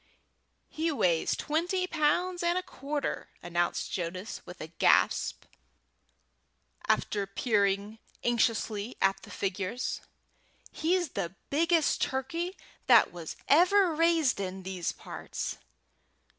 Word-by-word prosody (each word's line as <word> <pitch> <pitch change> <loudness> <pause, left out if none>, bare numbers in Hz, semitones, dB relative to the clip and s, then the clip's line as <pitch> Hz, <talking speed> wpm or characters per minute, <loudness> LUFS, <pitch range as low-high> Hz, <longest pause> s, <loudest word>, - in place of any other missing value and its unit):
"He 320 +1 -1
weighs 175 - +2
twenty 350 +4 0
pounds 350 +2 +1
and 345 +1 +2
a 365 - -1
quarter," 290 -4 -4
announced 175 0 -1
Jonas, 185 +4 -4
with 180 0 -10
a - - -5
gasp, 160 +1 +2 1.4
after 200 -2 +1
peering 200 0 0 0.2
anxiously 230 -2 0
at 195 0 +2
the - - -13
figures. 200 +5 -3 0.7
"He's 350 +1 +1
the 175 -5 -4 0.2
biggest 330 +1 +2
turkey 330 +8 -2 0.3
that - - +6
was 170 -3 -7
ever 360 +3 +5
raised 325 -6 +3
in 190 -1 -4
these 185 -2 -2
parts." - - -6
250 Hz, 105 wpm, -29 LUFS, -, 1.4 s, that